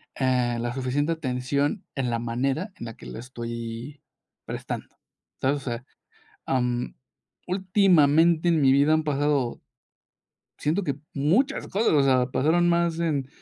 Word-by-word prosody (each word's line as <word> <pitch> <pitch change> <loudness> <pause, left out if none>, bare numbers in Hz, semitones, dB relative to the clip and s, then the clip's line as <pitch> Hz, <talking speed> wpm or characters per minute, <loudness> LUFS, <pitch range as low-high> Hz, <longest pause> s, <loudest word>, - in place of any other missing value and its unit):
ah, 125 -2 +1
la 120 +1 -2
suficiente 135 +5 0
atención 140 +4 -1
en 130 -3 -1
la 115 -1 -1
manera 135 - -2
en - - -8
la 115 - -9
que - - -13
la - - -7
estoy 115 +2 -7 0.4
prestando, - - -6 0.5
¿sabes?, 135 +2 +2
o - - -8
sea, 120 -1 -5 0.6
am, 125 -1 -1 0.5
últimamente 175 -4 +4
en 165 -2 +3
mi 135 -2 +5
vida 140 +3 +4
han 155 0 +1
pasado, 145 -4 0 1.0
siento 160 +7 0
que 140 -7 -2 0.2
muchas 165 - +1
cosas, 215 +4 +1
o 145 -3 +4
sea, 130 -2 +3
pasaron 165 +6 +3
más 170 -1 +1
en 150 -6 -1
140 Hz, 145 wpm, -25 LUFS, 125-165 Hz, 1.0 s, mi